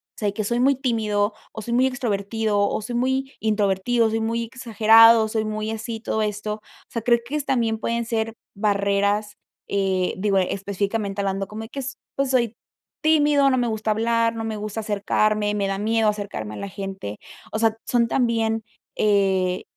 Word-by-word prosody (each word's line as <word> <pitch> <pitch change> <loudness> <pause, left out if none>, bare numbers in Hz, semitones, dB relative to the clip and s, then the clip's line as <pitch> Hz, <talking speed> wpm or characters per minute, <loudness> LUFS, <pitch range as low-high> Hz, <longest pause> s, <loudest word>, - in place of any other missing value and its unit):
o - - -61
sea 210 - -1
de 200 - 0
que 215 - -1
soy 235 +4 0
muy 275 +2 +4
tímido 215 -5 0 0.2
o 220 - -7
soy 235 +3 -3
muy 255 +2 +4
extrovertido, 220 -3 -1
o - - -2
soy 240 - -5
muy 265 +2 0
introvertido, 215 +2 +1
soy 225 - 0
muy 230 +1 -1
exagerado, 225 -1 +5
soy 220 0 -1
muy 215 0 -3
así, 225 0 -5
todo 220 -1 -1
esto, 210 0 -2
o 215 - -17 0.3
sea, 230 - -3
creo 235 +1 +4
que 280 +5 -4
es 295 -2 -2
también 230 -4 +1
pueden 235 +1 -1
ser 225 -1 -2 0.2
barreras, 200 0 +1 0.3
eh, 190 -2 0
digo, 200 -1 +2
específicamente 200 +2 -1
hablando, 195 0 -2
como 215 +1 -7
y - - -8
que 275 - -6
es, 270 0 -5 0.2
pues 275 -1 0
soy 240 -3 +1 0.5
tímido, 295 -3 +4
no 260 - +2
me 245 - +1
gusta 220 -1 -2
hablar, 230 +1 +1
no 225 - -4
me 220 -1 -3
gusta 215 +1 -4
acercarme, 210 0 +1
me 200 -1 0
da 195 0 -2
miedo 220 +1 +2
acercarme 200 - -4
a - - -7
la 200 - -5
gente. 195 - -6 0.3
O - - -2
sea, 225 -1 +2
son 235 -2 +2
también, 225 -2 +1 0.3
eh 190 -3 +2
220 Hz, 190 wpm, -23 LUFS, 205-235 Hz, 0.5 s, exagerado